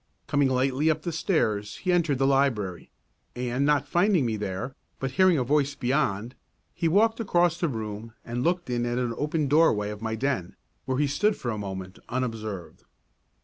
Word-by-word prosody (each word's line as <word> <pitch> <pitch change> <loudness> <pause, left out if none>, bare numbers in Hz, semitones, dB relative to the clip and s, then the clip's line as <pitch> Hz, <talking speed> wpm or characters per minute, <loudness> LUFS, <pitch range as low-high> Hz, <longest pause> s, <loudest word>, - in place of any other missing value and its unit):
Coming 145 -2 +2
lightly 130 +4 +2
up 155 -1 0
the 170 - -2
stairs 110 - 0
he 185 - -1
entered 170 -6 +2
the 135 - +2
library, 125 -10 +1 0.5
and 125 +3 0
not 145 -1 +2
finding 175 -2 +3
me 115 -2 0
there, 105 +5 -4 0.2
but 135 -1 -3
hearing 185 +3 +4
a 130 - +1
voice 140 +2 +1
beyond, 125 -4 0 0.4
he 170 - 0
walked 220 +7 +3
across 175 -5 +2
the 170 - +1
room 110 -2 -5
and 120 +1 -3
looked 175 +1 0
in 120 -1 0
at 120 - -1
the 120 -2 -1
open 150 +2 -1
doorway 130 -9 +3
of 105 0 -8
my 110 0 -2
den, 125 -7 -2 0.3
where 130 0 -1
he 150 - +3
stood 195 +10 +1
for 120 - -3
a 110 - -3
moment, 95 -2 -6
unobserved. 110 -7 -4
130 Hz, 185 wpm, -26 LUFS, 110-155 Hz, 0.5 s, hearing